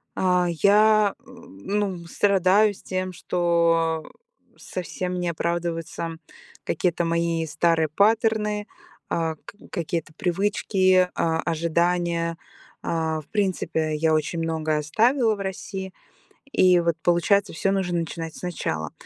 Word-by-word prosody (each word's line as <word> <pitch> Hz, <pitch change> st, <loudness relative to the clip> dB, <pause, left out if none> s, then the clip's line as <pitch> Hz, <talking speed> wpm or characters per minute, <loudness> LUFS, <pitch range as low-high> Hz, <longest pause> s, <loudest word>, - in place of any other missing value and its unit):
а, 180 Hz, -1 st, +2 dB
я, 205 Hz, +4 st, +4 dB
э, -, -, -32 dB
ну 185 Hz, -, -4 dB
страдаю 200 Hz, +2 st, +3 dB
с -, -, -16 dB
тем, 185 Hz, 0 st, -3 dB
что 170 Hz, -2 st, +1 dB, 0.5 s
совсем 180 Hz, 0 st, -4 dB
не 175 Hz, -1 st, -1 dB
оправдываются 165 Hz, -1 st, -3 dB, 0.5 s
какие-то 175 Hz, -1 st, 0 dB
мои 170 Hz, -1 st, 0 dB
старые 160 Hz, +1 st, +1 dB
паттерны, 210 Hz, +3 st, +1 dB, 0.4 s
а, 160 Hz, -1 st, -1 dB
к -, -, -10 dB, 0.2 s
какие-то 165 Hz, -3 st, -3 dB
привычки, 185 Hz, -1 st, +2 dB
а, 160 Hz, -1 st, 0 dB
ожидания. 170 Hz, 0 st, 0 dB, 0.5 s
А, 160 Hz, -1 st, -1 dB
в 145 Hz, -, -23 dB
принципе, 170 Hz, -6 st, -1 dB
я 160 Hz, +1 st, +2 dB
очень 155 Hz, +2 st, 0 dB
много 160 Hz, -1 st, -1 dB
оставила 225 Hz, -, +2 dB
в -, -, -12 dB
России. 190 Hz, 0 st, -5 dB, 0.6 s
И 180 Hz, -6 st, +5 dB
вот 170 Hz, -1 st, +1 dB
получается, 185 Hz, +4 st, +2 dB
всё 195 Hz, +4 st, 0 dB
нужно 180 Hz, -3 st, 0 dB
начинать 165 Hz, -1 st, -5 dB
сначала. 80 Hz, -, -4 dB
175 Hz, 115 wpm, -24 LUFS, 165-195 Hz, 0.6 s, И